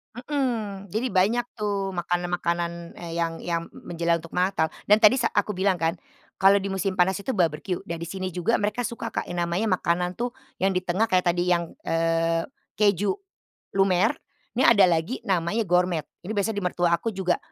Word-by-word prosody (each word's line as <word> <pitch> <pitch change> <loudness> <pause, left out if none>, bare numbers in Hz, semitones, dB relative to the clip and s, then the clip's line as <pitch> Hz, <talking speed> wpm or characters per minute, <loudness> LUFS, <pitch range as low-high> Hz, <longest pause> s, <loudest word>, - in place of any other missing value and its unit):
Hmm, 235 -7 -2
jadi 220 +5 -1
banyak 215 +6 +3
tuh 200 -2 -1
makanan-makanan, 175 -1 -2
eee, 170 -1 -7
yang 165 -1 -1
yang 170 -1 -2
menjelang 170 0 -1
untuk 165 - -12
Natal 180 -3 +1 0.2
dan 210 - +8
tadi 215 - +9
sa 235 - +2
aku 205 +1 0
bilang 190 0 +2
kan, 165 0 +1 0.5
kalau 195 +1 +7
di 195 0 -3
musim 190 0 -1
panas 185 +2 +3
itu 260 +2 -2
barbeque 170 +2 0
dan 170 -1 -5
di 170 - -4
sini 185 0 -4
juga 180 +6 +1
mereka 210 +4 -1
suka, 230 -1 -6
Kak, - - -2
yang 175 -1 -1
namanya 180 +6 -1
makanan 180 0 0
tuh, 240 +1 -2 0.3
yang 195 0 +3
di 180 - 0
tengah 185 +5 +1
kayak 185 0 +2
tadi 175 +1 +1
yang, 170 -1 +1 0.2
eee, 165 0 +1 0.3
keju 205 - +3 0.6
lumer. 195 +2 +3 0.4
Ini 260 - +4
ada 200 -5 +7
lagi 170 +9 0
namanya 185 +4 +1
gourmet. 180 -2 +2 0.2
Ini 220 - -3
biasanya 205 +1 -1
di - - -4
mertua 175 -1 +1
aku 225 - -3
juga, 185 -2 0
185 Hz, 185 wpm, -25 LUFS, 170-205 Hz, 0.6 s, tadi